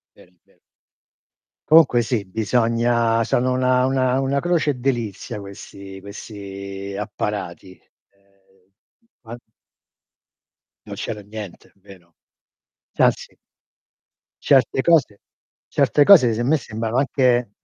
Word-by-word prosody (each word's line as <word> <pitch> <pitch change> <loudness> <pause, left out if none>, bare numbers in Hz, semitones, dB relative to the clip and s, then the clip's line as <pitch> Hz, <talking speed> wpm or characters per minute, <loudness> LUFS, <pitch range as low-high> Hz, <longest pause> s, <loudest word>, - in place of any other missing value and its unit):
Vero, 90 - -20
è - - -35
vero. - - -32 1.1
Comunque 150 -7 +5
sì, 115 -4 -2
bisogna 115 +2 +1
sono 125 +3 0
una 130 0 +2
una 130 -1 +1
una 135 +1 0
croce 170 -3 0
e - - -3
delizia 120 -4 -3
questi 100 0 -11
questi 100 -1 -9
apparati. 95 -3 -5 0.4
Ehm, 100 -1 -34 0.5
an 115 +2 -9 1.5
Non - - -7
c'era 105 - -6
niente, 105 -2 -10
vero? 95 -4 -18 0.8
Se - - +1
anzi - - 0 1.0
certe 135 -1 +2
cose 150 -11 +2 0.5
certe 145 - +2
cose 130 - +7
se 115 - -3
a - - -1
me 155 +5 +2
sembrano 115 -1 -4
anche 125 -4 +1
115 Hz, 110 wpm, -21 LUFS, 100-130 Hz, 1.5 s, cose